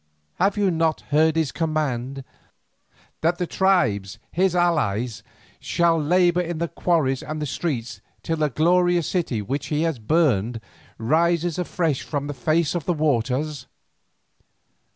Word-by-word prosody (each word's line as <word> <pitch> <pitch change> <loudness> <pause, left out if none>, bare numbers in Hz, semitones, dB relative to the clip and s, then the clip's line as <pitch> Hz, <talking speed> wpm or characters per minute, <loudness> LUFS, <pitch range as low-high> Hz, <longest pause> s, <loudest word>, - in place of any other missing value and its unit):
Have 195 +3 +2
you 200 -2 +2
not 165 -1 0
heard 155 +2 +4
his 160 -4 0
command, 140 -5 -2 1.0
that 170 +2 +1
the 180 - -1
tribes 120 - +1
his 185 0 +1
allies 125 - 0 0.4
shall 170 -2 +1
labour 175 +3 +3
in 175 -1 -4
the 170 +1 -1
quarries 155 -7 0
and 155 0 -5
the 150 - -2
streets 130 -5 -3 0.2
till 165 - -1
the 155 -1 +1
glorious 175 +4 +2
city 140 - -1
which 135 +7 -3
he 150 +1 0
has 165 -6 -1
burned 120 - +1 0.4
rises 170 +6 +1
afresh 165 -5 -1
upon 145 -2 -3
the 145 - -4
face 155 +2 +1
of 170 -5 -3
the 175 - +1
waters? 145 0 -1
155 Hz, 140 wpm, -23 LUFS, 135-170 Hz, 1.0 s, heard